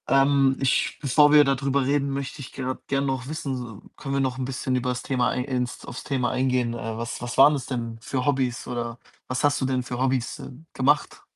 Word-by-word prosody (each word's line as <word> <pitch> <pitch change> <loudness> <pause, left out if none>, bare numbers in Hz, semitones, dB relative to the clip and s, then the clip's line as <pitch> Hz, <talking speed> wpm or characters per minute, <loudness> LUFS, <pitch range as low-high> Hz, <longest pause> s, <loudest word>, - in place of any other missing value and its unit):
Ähm, 135 0 +4
ich 135 - +1
bevor 145 +1 +4
wir 150 0 +8
dadrüber 135 0 +1
reden, 140 +1 +1
möchte 140 +1 -4
ich 125 - -9
grad 130 -1 -5
gern 140 0 0
noch 130 -2 -2
wissen, 130 -8 -5 0.2
können 140 -1 -4
wir - - +2
noch 130 -1 -1
'n 130 - -1
bisschen 130 0 -2
übers 125 0 -1
Thema 125 -2 +1
ei - - -1
ins 125 -1 -3
aufs 125 - -7
Thema 130 -4 0
eingehen? 125 -2 +1
Äh, 115 -1 -5
was 115 0 -5
was 120 0 -5
waren 145 +3 +8
das 135 -3 -3
denn 115 -3 -4
für 125 +2 -2
Hobbys? 130 -4 0
Oder 120 -1 -4 0.3
was 130 0 -2
hast 145 0 +2
du - - +1
denn 130 -1 0
für 125 0 -5
Hobbys, 130 -2 0
äh, - - -8 0.2
gemacht? 145 +3 +1
130 Hz, 215 wpm, -25 LUFS, 125-140 Hz, 0.3 s, wir